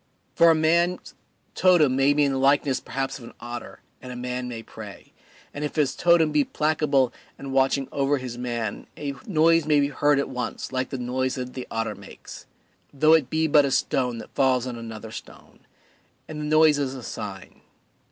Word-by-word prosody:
For 170 - +6
a 165 - +5
man's 170 +3 +1 0.4
totem 165 -8 +4
may 135 +1 +4
be 145 0 +2
in 140 - +2
the 135 - -1
likeness 140 0 +2
perhaps 135 +1 -4
of - - -13
an 115 - -12
otter, 120 0 -8 0.2
and 125 - -8
a - - -7
man 125 0 -4
may 115 -2 -6
pray, - - -11 0.4
and 145 - -5
if 150 - -4
his 145 -3 +1
totem 170 -3 +4
be 150 -1 +3
placable 150 -4 +1 0.2
and 135 -1 -7
watching 135 0 +2
over 140 +1 +1
his 125 -2 -6
man 120 -3 -4
a 145 -2 -4
noise 165 -3 +3
may 150 -1 +4
be 140 0 +1
heard 145 +1 +2
at 140 - 0
once 125 -1 -5
like 130 -1 -2
the 135 - -4
noise 130 +1 -2
that 125 -1 -5
the 130 - -7
otter 115 0 -2
makes, - - -12 0.4
though 155 +3 +4
it 155 -6 +3
be 160 +2 +1
but 150 -1 +5
a 140 - 0
stone 125 -2 0
that 115 - -10
falls 130 -2 +2
on 125 -2 -5
another 115 -1 -8
stone; - - -12 0.6
and 155 -1 -6
the - - -3
noise 155 -1 +4
is 135 -2 -2
a 130 - -8
sign. 95 -4 -8
135 Hz, 200 wpm, -24 LUFS, 125-150 Hz, 0.6 s, For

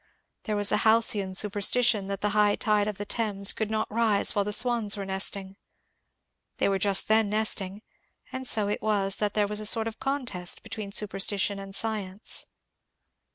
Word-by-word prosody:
There 215 - -3
was 205 -1 +1
a - - +2
halcyon 220 -4 +1
superstition 210 +1 +2
that 200 0 -6
the 210 - 0
high 210 -1 +2
tide 210 -2 0
of 210 -2 -5
the 205 - -6
Thames 205 -2 +1
could 220 -1 -4
not 220 0 -2
rise 220 -3 +5
while 205 - 0
the 210 - -4
swans 225 -2 +3
were 200 - -6
nesting. 190 0 -3 1.0
They - - 0
were 195 -1 -1
just 195 0 +1
then 220 -1 +2
nesting, 210 -1 -1 0.5
and 260 0 -6
so 215 -3 +3
it 205 - -4
was 200 -2 -1
that 210 -1 -2
there 210 -1 +1
was 210 +1 -5
a 215 - -7
sort 225 +1 +3
of 225 - -8
contest 255 -10 -4
between 205 -2 -8
superstition 200 -1 -2
and 195 0 -7
science. 210 -3 -2
210 Hz, 180 wpm, -25 LUFS, 195-220 Hz, 1.0 s, rise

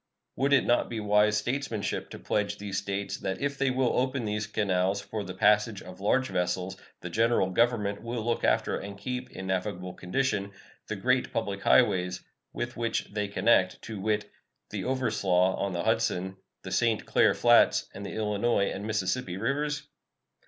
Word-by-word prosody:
Would 140 +1 +1
it 140 - +5
not 120 - +2
be 115 - -3
wise 105 0 +3
statesmanship 120 -1 -2
to - - -8
pledge 105 -1 -1
these 100 -2 -3
States 100 0 -3
that 95 -1 -3
if 140 -1 -2
they 135 -1 +2
will 130 -1 +1
open 130 -1 -1
these 105 0 -2
canals 95 -2 +1
for 105 +1 -5
the 95 -1 -7
passage 105 0 +3
of 90 0 -11
large 130 +6 +2
vessels 90 0 -1 0.3
the - - -5
General 115 -4 +2
Government 105 -2 +1
will 115 -1 -4
look 120 0 0
after - - +2
and 100 0 -8
keep 125 +5 -4
in 95 - -8
navigable 90 -1 -2
condition 100 0 -1 0.3
the - - -3
great - - +1
public - - -2
highways 90 0 +3 0.3
with 120 0 -4
which 115 -3 -2
they 105 -1 -1
connect, 100 -2 +2
to 110 -3 -6
wit, 105 +1 0 0.4
the - - -4
Overslaugh 100 -8 +2
on 100 - -2
the 85 -1 -2
Hudson, 95 +3 0 0.3
the 95 - -7
St. 115 +2 +1
Clair - - +3
Flats, - - +5
and 100 - -8
the - - -6
Illinois 105 -1 +1
and 100 +2 -5
Mississippi 105 -2 -1
rivers? 145 +7 -1
105 Hz, 175 wpm, -28 LUFS, 95-120 Hz, 0.4 s, it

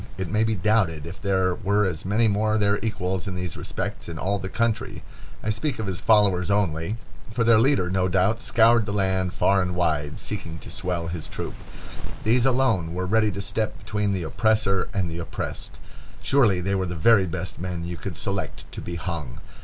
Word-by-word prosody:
It 95 -2 -4
may 110 +1 +3
be 110 0 +1
doubted 95 -6 +1
if 85 +3 -9
there 95 -2 +2
were 100 +1 +1
as 90 -3 -3
many 110 +4 +3
more 110 +1 +2
their 100 -1 +2
equals 95 -4 -2
in 95 - -3
these 90 -3 -4
respects - - -5
in 85 - -6
all 100 +4 0
the 95 0 -5
country—I 115 -1 -3
speak 130 +7 -2
of 110 - -3
his 95 -3 -4
followers 100 -5 +4
only—for 100 +5 -2
their 115 -1 +6
leader, 130 -6 +3
no 95 -1 +2
doubt, 95 +5 +2
scoured 115 -1 +4
the 100 - -2
land 95 -2 +1
far 100 +1 +3
and 90 -1 -2
wide, 75 -4 0
seeking 85 -6 -5
to - - -10
swell 90 -2 -2
his 85 -2 -4
troop. - - -5 0.7
These 120 +3 +3
alone 115 -11 +1
were 90 +1 -1
ready 110 +3 +3
to 100 +1 -4
step 100 +2 -1
between 105 -1 -1
the 95 -3 -1
oppressor 100 +1 +1
and 95 -5 -1
the 85 +1 -5
oppressed. 85 - -5 0.5
Surely 110 -10 +3
they 100 +2 -1
were 95 -1 0
the 90 - -4
very 95 +3 +5
best 90 +2 -5
men 90 -1 -4
you 85 0 -4
could - - -6
select - - -3
to - - -6
be 85 - -5
hung. 80 -9 -5
95 Hz, 195 wpm, -25 LUFS, 90-110 Hz, 0.7 s, their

